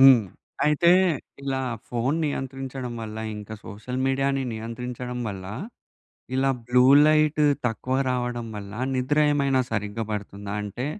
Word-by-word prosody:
హ్మ్. 135 -3 +9 0.4
అయితే 150 +3 +4 0.5
ఇలా 135 -1 -1 0.3
ఫోన్ 125 +5 0
నియంత్రించడం 135 -3 -4
వల్ల, 110 0 -6 0.2
ఇంక 105 0 -9
సోషల్ 115 +5 -5
మీడియా‌ని 135 0 +1
నియంత్రించడం 125 +2 -5
వల్ల, 95 -2 -6 0.9
ఇలా 135 +1 +2 0.2
బ్లూ 125 +1 +5 0.2
లైట్ 155 0 +3 0.3
తక్కువ 125 +3 -2
రావడం 125 -1 -1
వల్ల 100 -1 -7 0.2
నిద్ర 130 +4 0
ఏమైనా 140 -2 +2
సరిగ్గా 105 +1 -2
పడుతుందా 100 0 -5
అంటే, 105 +5 -4
125 Hz, 120 wpm, -25 LUFS, 110-135 Hz, 0.9 s, హ్మ్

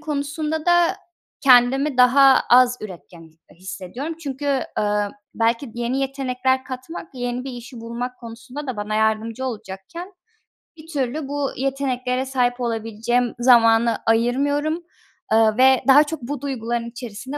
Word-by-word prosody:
konusunda 305 +1 -3
da 345 -1 +4 0.4
kendimi 260 +2 +4
daha 265 +2 +6
az 250 0 +6
üretken, 180 -4 -10 0.3
eee, - - -19
hissediyorum 195 - -6
çünkü, 280 -1 -5 0.3
aaa, 205 0 0 0.3
belki 230 +2 0
yeni 240 +3 -2
yetenekler 260 -1 -1
katmak 260 +6 -8
yeni 245 0 -3
bir 270 - -5
işi 240 0 -10
bulmak 240 +2 -5
konusunda 245 +5 -9
da 255 -4 -4
bana 210 +1 -3
yardımcı 220 +3 0
olacakken, 225 - -7 0.6
bir 310 +1 -14
türlü 280 -1 -3
bu 285 -1 -2
yeteneklere 260 -1 -1
sahip 250 -2 0
olabileceğim 230 +1 -1
zamanı 230 -2 +5
ayırmıyorum. 285 +8 +1 0.5
Aaa, 220 -1 +3
ve 260 0 +5
daha 285 +2 +8
çok 305 -1 -6
bu 275 +2 -5
duyguların 235 -4 -3
içerisinde 245 +3 -7
250 Hz, 130 wpm, -22 LUFS, 230-275 Hz, 0.6 s, daha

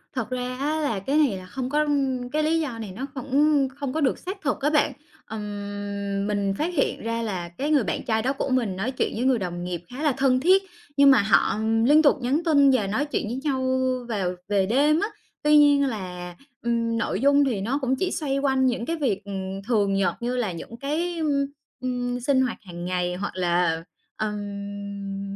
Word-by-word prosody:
Thật 255 -4 -2
ra 250 0 -3
á 300 +3 0
là 225 -9 0
cái 275 +10 0
này 275 -11 +3
là 185 - -9
không 255 +6 -4
có 300 +2 +2 0.5
cái 305 +1 +1
lý 320 +2 +2
do 265 -8 -3
này 215 -4 -6
nó 215 +9 -5
cũng 280 +1 +2
không 280 -2 -4
có 315 - -1
được 270 - +2
xác 385 +2 -6
thực 285 -5 -1
á 290 - +2
bạn. 300 -1 +2 0.3
Ừm, 205 -1 -4
mình 200 -1 0
phát 335 +4 -1
hiện 280 - 0
ra 230 0 -1
là 185 -6 -3
cái 280 - -3
người 285 -5 +4
bạn - - -2
trai 220 -3 +1
đó 260 +4 0
của 275 - -3
mình 235 -7 +1
nói 210 +7 -2
chuyện 255 - -1
với 230 - -1
người 260 -2 +3
đồng 175 -2 -4
nghiệp 175 -1 -4
khá 265 +5 -6
là 300 - +4
thân 260 -1 +3
thiết, 375 +7 +4 0.3
nhưng 280 -1 +8
mà 250 - +6
họ 205 0 +3 0.3
liên 295 +3 +6
tục 290 - +5
nhắn 270 +7 +1
tin 285 -4 +5
và 220 -7 +2
nói 240 +9 0
chuyện 290 - -2
với 240 - -3
nhau 260 -3 0 0.3
vào 190 -5 -1
về 200 -2 +2
đêm 290 - +3
á. 410 - 0 0.4
Tuy 300 0 +6
nhiên 285 -1 +6
là, 180 -6 -5 0.3
ừm, 230 -1 0
nội 215 -2 -1
dung 285 +1 +5
thì 230 -8 -1
nó 250 +7 0
cũng 260 0 +1
chỉ 365 +7 -1
xoay 275 -3 -1
quanh 265 -1 +2
những 240 -2 0
cái 330 - -1
việc, 245 - 0
ừm, 195 -1 -5
thường 205 -5 +2
nhật 195 -2 +1
như 245 +1 -1
là 235 -6 0
những 180 +7 -8
cái, 330 +6 -2
ừm, 285 -3 +1 0.4
ừm, 245 -1 -2
sinh 260 +1 +2
hoạt 250 -3 -1
hằng 175 -3 -8
ngày 180 0 -1
hoặc 200 +3 -4
là, 175 -2 +1 0.3
ừm, 200 -1 -5
245 Hz, 220 wpm, -25 LUFS, 200-280 Hz, 0.5 s, nhưng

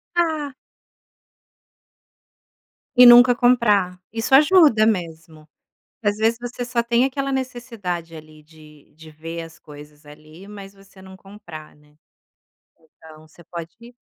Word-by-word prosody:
Ah. 310 -5 -2 2.4
E 250 - +7
nunca 245 0 +7
comprar, 210 -7 +1
isso 225 +4 -4
ajuda 295 - +5
mesmo. 160 -6 -4 0.6
Às 205 0 -1
vezes 225 +1 0
você 245 0 -6
só 240 -1 -2
tem 235 +2 +1
aquela 275 +1 -4
necessidade 230 -11 -6
ali 155 -1 -15
de 150 -2 -20
de 160 0 -15
ver 165 +2 -8
as 165 0 -13
coisas 150 0 -16
ali, 155 +5 -16
mas 200 -1 -12
você 195 -1 -20
não 190 0 -14
comprar, 190 -6 -14
né. 150 0 -27 0.8
Então 155 -1 -19
você 170 +2 -20
pode, 175 +9 -12
195 Hz, 125 wpm, -20 LUFS, 160-240 Hz, 2.4 s, E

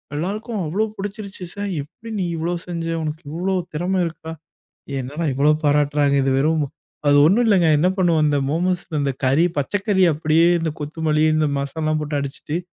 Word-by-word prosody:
எல்லாருக்கும் 210 +7 -3
அவ்ளோ 185 +8 0
புடிச்சுருச்சு. 200 -1 -6
சய் 200 -1 -4
"எப்டி 180 +10 -12
நீ 185 - 0
இவ்ளோ 170 +2 -1
செஞ்ச? 170 -1 -4 0.2
உனக்கு 155 +2 -5
இவ்ளோ 185 +4 -1 0.2
திறம 180 +4 0
இருக்கா?" 160 -1 -7 0.7
என்னடா 145 +6 -4
இவ்ளோ 140 +3 +3
பாராட்டறாங்க. 145 -1 +2
இது 135 - +1
வெறும் 155 +3 +2
மொ - - -3 0.4
அது 145 0 +6
ஒண்ணும் 200 +10 +4
இல்லங்க. 185 -6 +4
என்ன 170 - +3
பண்ணுவோம்? 170 -4 +3
இந்த 145 - +2
மோமோஸ்ல, 175 +2 -1
அந்தக் 140 -2 -2
கறி 140 +7 +4
பச்சக்கறி 190 +6 +1
அப்டியே 155 +2 +3
இந்தக் 160 -2 -3
கொத்துமல்லி, 155 0 0
இந்த 155 0 +2
மசால்லாம் 155 +2 -1
போட்டு 150 -1 -2
அடிச்சிட்டு, 140 +3 -4
160 Hz, 165 wpm, -21 LUFS, 145-185 Hz, 0.7 s, அது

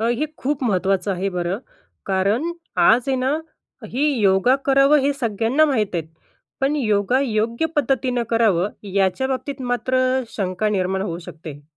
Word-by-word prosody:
अ, 225 - 0
हे 305 - 0 0.2
खूप 275 0 -1
महत्त्वाचं 195 -2 +1
आहे 190 +2 -2
बरं. 180 +2 -2 0.5
कारण 200 - 0 0.3
आज 235 +3 +5
आहे 265 - +1
ना 265 +4 0 0.5
ही 280 +5 +1
योगा 195 +6 +4
करावं 275 +2 +5
हे 280 +1 +1
सगळ्यांना 230 +6 +2
माहीती 220 - 0
आहेत. 160 -1 -6 0.5
पण 275 +3 +1
योगा 215 -1 +1
योग्य 235 +3 0
पद्धतीनं 255 -3 +1
करावं 210 -5 +2 0.2
याच्याबाबतीत 260 +8 -1
मात्र 255 +1 0 0.4
शंका 195 +1 -1
निर्माण 190 -1 0
होऊ 170 -4 -4
शकते. 155 -3 -10
225 Hz, 145 wpm, -21 LUFS, 190-265 Hz, 0.5 s, आज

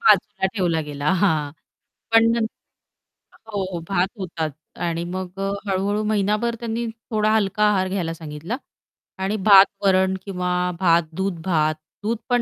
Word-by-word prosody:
बाजूला 455 - +3
ठेवला 175 -5 +1
गेला. 145 +3 -1
हां. 155 -6 +2 0.6
पण 225 0 +6
नंत 225 -1 +1 1.0
हो, 210 - -5
हो. 175 - -3
भात 185 -1 +2
होतात 165 -4 -3 0.3
आणि 170 0 -1
मग 185 0 -6
अ, 195 0 -1 0.2
हळू-हळू 200 +2 0
महिनाभर 210 +3 +1
त्यांनी 235 0 -2 0.3
थोडा 215 -1 +2
हलका 210 0 +1
आहार 190 -2 +2
घ्यायला 180 -4 -2
सांगितला 160 +7 -6 0.7
आणि 200 +3 0
भात-वरण 190 -1 +5
किंवा 180 -2 -2 0.3
भात-दूध, 170 +1 +1
भात, 155 -4 +2 0.3
दूध 225 +2 0
पण 245 -1 +3
190 Hz, 135 wpm, -22 LUFS, 170-210 Hz, 1.0 s, पण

